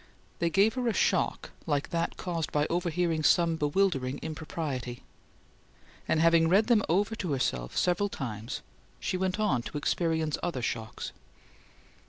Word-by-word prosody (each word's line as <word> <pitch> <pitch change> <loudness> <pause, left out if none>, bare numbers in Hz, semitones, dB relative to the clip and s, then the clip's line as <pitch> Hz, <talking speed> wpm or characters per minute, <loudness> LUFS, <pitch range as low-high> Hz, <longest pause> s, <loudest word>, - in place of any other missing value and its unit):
They 170 - +2
gave 200 +6 +4
her 255 -2 -1
a 230 - +2
shock - - +1 0.2
like 145 -2 0
that 170 0 -1
caused 170 -4 -3
by 150 0 +2
overhearing 170 -1 0
some 165 +1 +4
bewildering 145 -4 +1
impropriety; 150 -6 -4 1.0
and, 160 - +2
having 165 0 +5
read 200 +5 +5
them 230 -2 +4
over 200 +6 +2
to 180 -8 -2
herself 60 - -1
several 180 +3 +2
times, 115 - -5 0.4
she - - -2
went 185 +2 -1
on 200 - +2
to 145 - -6
experience 160 0 0
other 165 -9 -2
shocks. 110 -1 -3
165 Hz, 145 wpm, -29 LUFS, 145-185 Hz, 1.0 s, having